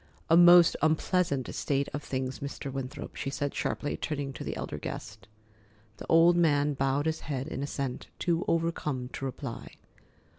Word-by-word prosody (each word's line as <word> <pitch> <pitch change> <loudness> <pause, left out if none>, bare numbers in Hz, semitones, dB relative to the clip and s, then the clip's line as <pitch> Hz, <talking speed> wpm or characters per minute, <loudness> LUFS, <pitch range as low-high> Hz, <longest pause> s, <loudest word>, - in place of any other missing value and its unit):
"A - - +8
most 175 0 +8
unpleasant 155 -3 +1
state 140 -1 0
of 145 - -3
things, 130 -2 -3
Mr. 140 -1 -6
Winthrop," 135 -1 -6
she 135 - -3
said 145 0 -2
sharply, 145 - -2
turning 140 -3 -3
to - - -7
the - - -4
elder 75 - -5
guest. 95 - -7 0.7
The - - -9
old 165 +1 +6
man 150 -4 +3
bowed 135 +2 0
his 160 0 0
head 135 -1 -4
in 135 - -4
assent, 140 -2 -4
too 170 -1 0
overcome 155 -6 -1
to 135 - -6
reply. 130 -1 -6
145 Hz, 160 wpm, -29 LUFS, 135-165 Hz, 0.7 s, A